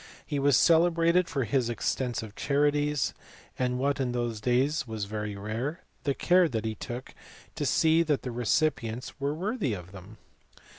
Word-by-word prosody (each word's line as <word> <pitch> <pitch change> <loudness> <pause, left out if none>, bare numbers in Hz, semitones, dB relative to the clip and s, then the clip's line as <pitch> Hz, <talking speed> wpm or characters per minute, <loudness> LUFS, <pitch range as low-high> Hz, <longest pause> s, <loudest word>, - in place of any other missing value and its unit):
He 145 -2 -2
was 140 -2 +4
celebrated 170 +1 +4
for 135 -3 -1
his 120 +1 0
extensive 115 -2 -2
charities, 145 0 +1 0.5
and, 125 -1 0
what 140 +2 0
in 125 -2 -1
those 120 -3 -2
days 130 +4 +1
was 110 -3 -3
very 105 0 -4
rare, 115 - -4 0.2
the 140 -1 +1
care 180 -1 +4
that 110 -4 -3
he 110 - -1
took 120 +4 -7 0.4
to - - -2
see 160 +1 +4
that 155 -4 0
the 125 - -4
recipients 120 0 -1
were 140 +2 -1
worthy 190 - -1
of 90 0 -10
them. 100 +3 -12
130 Hz, 160 wpm, -28 LUFS, 115-150 Hz, 0.5 s, was